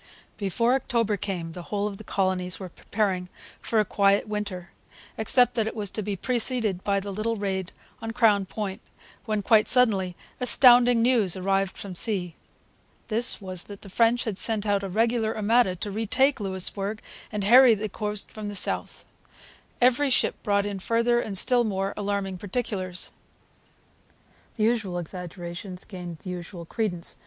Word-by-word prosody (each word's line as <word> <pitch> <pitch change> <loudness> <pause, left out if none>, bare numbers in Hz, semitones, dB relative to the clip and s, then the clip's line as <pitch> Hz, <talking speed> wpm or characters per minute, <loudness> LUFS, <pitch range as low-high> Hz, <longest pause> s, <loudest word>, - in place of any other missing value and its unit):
] - - -32
Before 230 +4 +1
October 235 -5 0
came 180 -5 -4
the 175 - -8
whole 200 +3 -3
of 205 -2 -4
the - - -9
colonies 185 -3 -1
were 190 -2 -7
preparing 185 -1 -2 0.3
for 225 - 0
a 210 - +2
quiet 200 +1 +2
winter, 205 -4 -5 0.4
except 245 +3 +4
that 225 -2 0
it 220 - -5
was 205 -3 -2
to 215 - -2
be 205 0 -3
preceded 230 -3 +1
by 200 -1 +1
the 200 0 -6
little 220 +3 -2
raid 190 -3 -3 0.3
on 225 - -5
Crown 220 -4 +2
Point, 200 +1 -5 0.4
when, 215 -3 -1
quite 215 +1 +4
suddenly, 200 -8 +3 0.2
astounding 245 -2 +6
news 230 -8 +2
arrived 195 0 -1
from 195 -2 -7
sea. 180 -2 0 0.8
This 235 +3 0
was 185 -3 -1
that 205 -1 -11
the 195 - -11
French 235 +3 +2
had 210 -4 -4
sent 220 -2 +1
out 200 -1 +1
a 195 - -5
regular 225 +2 0
armada 215 -2 +2
to 205 +3 -5
retake 225 +7 +1
Louisbourg 195 +2 -2 0.3
and 210 -2 -3
harry 240 +3 +7
the 215 +1 -4
coast 210 0 -4
to 215 - -9
the 205 -1 -5
south. 185 - -1 0.7
Every 255 +3 +3
ship 250 - +2
brought 200 -2 +1
in 200 -1 -4
further 235 +4 +1
and 205 -5 -2
still 245 +4 +5
more 195 -2 -2
alarming 200 -2 -3
particulars. 190 -4 -4 1.4
The 215 - -1
usual 220 -6 0
exaggerations 175 +1 -6
gained 175 -4 -8
the 185 - -8
usual 175 -1 -7
credence. 180 -3 -4
205 Hz, 165 wpm, -25 LUFS, 190-225 Hz, 1.4 s, harry